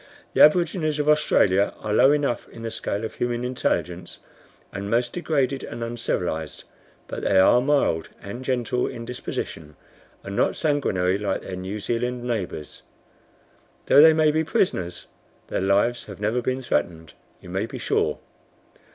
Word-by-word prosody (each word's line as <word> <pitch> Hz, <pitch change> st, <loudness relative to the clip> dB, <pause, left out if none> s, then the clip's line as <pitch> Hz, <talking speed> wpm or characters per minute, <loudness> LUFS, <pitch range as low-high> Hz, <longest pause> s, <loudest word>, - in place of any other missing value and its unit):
"The -, -, +3 dB
aborigines 155 Hz, -1 st, +4 dB
of 150 Hz, 0 st, -1 dB
Australia 100 Hz, -10 st, +3 dB
are 105 Hz, -1 st, -4 dB
low 135 Hz, +6 st, +6 dB
enough 145 Hz, -4 st, 0 dB
in 115 Hz, -, -11 dB
the 115 Hz, -, -4 dB
scale 110 Hz, -1 st, -3 dB
of -, -, -6 dB
human 120 Hz, 0 st, -2 dB
intelligence, 125 Hz, 0 st, -2 dB, 0.6 s
and 100 Hz, +1 st, -5 dB
most 120 Hz, +2 st, +1 dB
degraded 140 Hz, -6 st, -1 dB
and 115 Hz, -, -6 dB
uncivilized, 90 Hz, -9 st, -3 dB, 0.4 s
but -, -, -5 dB
they 95 Hz, -, +2 dB
are 95 Hz, +6 st, +6 dB
mild 135 Hz, -, +1 dB
and 110 Hz, +6 st, -8 dB
gentle 125 Hz, -1 st, 0 dB
in 115 Hz, -, -7 dB
disposition, 80 Hz, -10 st, -6 dB, 0.5 s
and 100 Hz, -, -6 dB
not -, -, +1 dB
sanguinary 100 Hz, -, 0 dB
like 100 Hz, -2 st, -2 dB
their 95 Hz, -, -6 dB
New 95 Hz, +3 st, -5 dB
Zealand 120 Hz, +3 st, -2 dB
neighbors. 100 Hz, -10 st, -4 dB, 1.0 s
Though 145 Hz, -, +7 dB
they 160 Hz, +1 st, +9 dB
may 155 Hz, -1 st, +3 dB
be 160 Hz, +1 st, +1 dB
prisoners, 95 Hz, -, -1 dB, 0.4 s
their -, -, -1 dB
lives 100 Hz, +5 st, +1 dB
have 100 Hz, -2 st, -10 dB
never 110 Hz, +4 st, 0 dB
been 130 Hz, +2 st, -2 dB
threatened, 80 Hz, -5 st, -2 dB, 0.3 s
you -, -, -13 dB
may 95 Hz, +4 st, -2 dB
be -, -, -7 dB
sure. -, -, 0 dB
120 Hz, 155 wpm, -24 LUFS, 100-135 Hz, 1.0 s, they